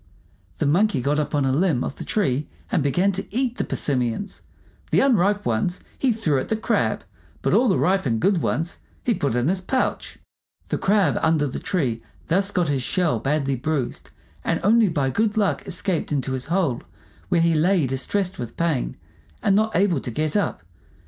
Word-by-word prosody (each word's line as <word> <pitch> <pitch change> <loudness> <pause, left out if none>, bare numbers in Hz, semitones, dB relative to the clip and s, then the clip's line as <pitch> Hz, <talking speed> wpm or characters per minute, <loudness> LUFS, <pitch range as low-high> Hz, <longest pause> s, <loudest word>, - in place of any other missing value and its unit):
The - - 0
Monkey 170 +2 +3
got 145 +4 +1
up 150 0 -2
on 145 -2 +2
a 135 - +2
limb 150 -3 +2
of - - -5
the - - -6
tree 150 -9 0 0.2
and - - +2
began 175 +8 +2
to 195 0 -4
eat 245 +2 -1
the - - +2
persimmons. 125 - -2 0.5
The - - +3
unripe 205 -6 +3
ones 120 +11 0 0.2
he 265 - +1
threw 170 - +1
at - - -4
the 220 - 0
Crab, 220 - 0 0.4
but - - +1
all 255 - +4
the 190 - +3
ripe 190 -4 +2
and 115 -2 0
good 190 - +2
ones 165 +3 -2 0.2
he 240 - +2
put 140 - -1
in 125 +2 +1
his 185 +2 +1
pouch. 255 +8 -2 0.5
The - - -1
Crab 200 0 +2
under 160 -2 +2
the 130 - -4
tree 125 - -1 0.2
thus 195 +4 +2
got 180 -4 0
his 140 -2 0
shell 155 -2 0
badly 140 +2 0
bruised, 140 -1 -3 0.3
and - - 0
only 220 +1 +5
by 140 -5 0
good 215 - 0
luck 205 -2 0
escaped 185 -7 -1
into 135 -2 -1
his 130 -1 -3
hole, 165 -8 0 0.5
where 170 - +3
he 165 0 +3
lay 165 +1 +3
distressed 180 +9 -2
with 120 - -6
pain, 165 -6 -1 0.5
and 195 - +3
not 220 +1 +1
able 180 -4 +3
to 125 - -5
get 150 +5 -2
up. 200 - 0
165 Hz, 195 wpm, -23 LUFS, 135-200 Hz, 0.5 s, only